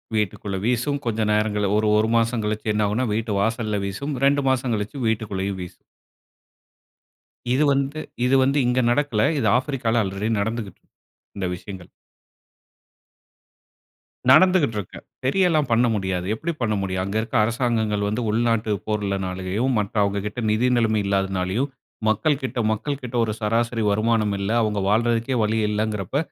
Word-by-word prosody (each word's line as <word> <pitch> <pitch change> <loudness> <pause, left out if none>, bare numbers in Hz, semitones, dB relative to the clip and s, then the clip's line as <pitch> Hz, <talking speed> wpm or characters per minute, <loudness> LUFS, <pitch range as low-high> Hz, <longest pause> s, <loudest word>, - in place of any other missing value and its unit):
வீட்டுகுள்ள 100 -1 -2
வீசும், 125 +4 0
கொஞ்சம் 110 -2 0
நேரங்கள்ல 105 -1 +1
ஒரு 110 0 +1
1 110 +1 +2
மாசம் 115 0 +1
கழிச்சு 110 0 -1
என்ன 105 0 +1
ஆகும்னா 110 +5 0
வீட்டு 110 0 -1
வாசல்ல 110 -1 -1
வீசும். 140 +10 -4
2 140 0 +3
மாசம் 130 -2 0
கழிச்சு 105 +6 -4
வீட்டுகுள்ளேயும் 100 -3 -2
வீசும். 90 - -8 1.8
இது 140 +4 +3
வந்து 140 +2 -1 0.3
இது 130 +2 +3
வந்து 135 +2 +1
இங்க 125 +1 +2
நடக்கல. 120 -5 +1 0.2
இது 115 - +1
ஆஃப்ரிக்கால 125 -4 0
ஆல்ரெடி 100 +2 -3
நடந்துகுட்டு 110 -2 -4
இருக்கு - - -39 0.5
இந்த 95 -2 -1
விஷயங்கள். 95 -1 -10 2.4
நடந்துகிட்டு 155 - +5
இருக்கு, 100 - -6 0.2
சரியலாம் 155 0 +2
பண்ண 115 +2 +4
முடியாது, 95 -3 -2
எப்டி 160 +10 -3
பண்ண 110 -3 +1
முடியும்? 95 -1 -2
அங்க 100 +2 -4
இருக்க 115 +3 -6
அரசாங்கங்கள் 110 -2 0
வந்து 110 +4 -1
உள்நாட்டு 115 0 +1 0.2
போர்ளனாலயும், 100 +2 -1
மற்ற 105 -1 -3
அவங்ககிட்ட 100 +3 -2
நிதி 110 +4 +2
நிலைமை 110 -2 +2
இல்லாதனாலேயும், 95 +5 0 0.4
மக்கள்கிட்ட 130 +3 0
மக்கள்கிட்ட 125 +2 -4
ஒரு 110 - -2
சராசரி 115 +2 0
வருமானம் 110 0 +1
இல்ல 100 +2 -2
அவங்க 105 -2 0
வாழ்றதுக்கே 115 +3 +1
வழி 110 +1 0
இல்லைங்கிறப்ப, 105 +1 -2
110 Hz, 135 wpm, -23 LUFS, 105-125 Hz, 2.4 s, நடந்துகிட்டு